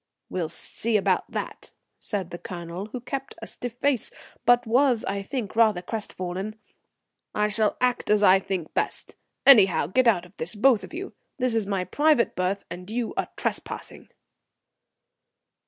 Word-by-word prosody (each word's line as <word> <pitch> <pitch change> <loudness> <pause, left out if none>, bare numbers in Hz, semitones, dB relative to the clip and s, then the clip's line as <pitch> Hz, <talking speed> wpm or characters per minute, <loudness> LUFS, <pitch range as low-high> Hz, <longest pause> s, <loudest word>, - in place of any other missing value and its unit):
"We'll 175 -4 -2
see 220 +6 -1
about 200 - +1
that," - - -5 0.3
said 190 -5 -3
the 175 - -6
Colonel, 175 +2 -6
who 245 +3 -6
kept 270 +2 -5
a - - -7
stiff 245 -2 -6
face, 260 -1 0 0.4
but 245 0 +5
was, 245 0 +3
I 200 0 -2
think, 215 0 -4
rather 215 -6 +4
crestfallen. 195 -1 -4 0.8
"I 210 0 +2
shall 210 0 +1
act 250 -1 0
as 210 0 +4
I 190 -1 +7
think 185 -4 -4
best. - - -2 0.3
Anyhow, 205 - +7
get 245 - +2
out 185 -6 +3
of 180 +3 -19
this, 170 +6 -3
both 225 -2 +4
of - - -9
you. 380 +4 -6 0.2
This 255 -3 +1
is 225 -3 0
my 195 -2 0
private 290 - +2
berth, 185 +2 -1
and 180 +2 -8
you 235 +1 -2
are - - -1
trespassing." - - -4
210 Hz, 160 wpm, -25 LUFS, 185-245 Hz, 0.8 s, I